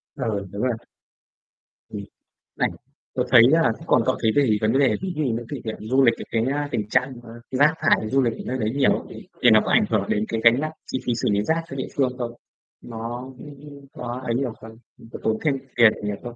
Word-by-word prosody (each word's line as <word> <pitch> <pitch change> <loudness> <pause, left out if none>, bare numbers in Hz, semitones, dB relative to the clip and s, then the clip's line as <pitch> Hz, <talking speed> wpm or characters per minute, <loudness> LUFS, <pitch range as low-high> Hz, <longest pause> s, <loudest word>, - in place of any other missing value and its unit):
Ừ, 110 -8 -3
đúng 100 +1 -5
rồi. 125 -1 +1 1.2
Ừm, 100 - -6 0.5
này, - - +1 0.5
tớ - - +1
thấy, 120 -2 +9
à, 165 - +5
thế - - +4
thì - - -12
còn - - +4
cậu - - +2
thấy 110 - +3
về 140 -4 +3
vấn 110 +1 +2
đề, 140 - +3
ví 185 -1 -3
dụ, 155 - -1
những 120 -3 -2
cái 145 - -5
điểm 110 -1 -4
du 130 +5 +2
lịch, 115 -2 +5 0.2
cái, 115 -1 +1
a, 145 0 -2
tình 105 -5 -2
trạng, 125 +4 +1
a, 115 - -12 0.2
rác 145 +4 +4
thải 110 - +2
du 135 +3 +3
lịch 120 -3 +1
ở - - -12
nơi 130 - -2
đấy 110 -3 -1
nhiều 140 -2 +4
ấy - - -2
thì - - -11
thì - - +6
nó - - +6
có - - -1
ảnh - - +4
hưởng - - +1
đến 105 +1 +1
cái 115 -1 -2
gánh 115 +2 +6
nặng 155 +1 -2 0.2
chi 130 - -1
phí 120 - +1
xử 115 - -1
lý 100 0 +1
rác 165 +6 0
cho - - -7
địa 130 - -3
phương 130 -3 +2
không? 120 -2 -3 0.5
Nó, 115 +1 -6 0.2
ừm, 145 0 -12
có 125 +1 -6
ấy 115 - 0
nhiều 125 -2 -1
không, 110 0 -12 0.4
có - - -6
tốn 110 - +1
thêm 150 -3 +2 0.2
tiền 115 -2 +6
nhiều 105 0 -2
không 120 -1 -7
120 Hz, 250 wpm, -23 LUFS, 110-140 Hz, 1.2 s, thấy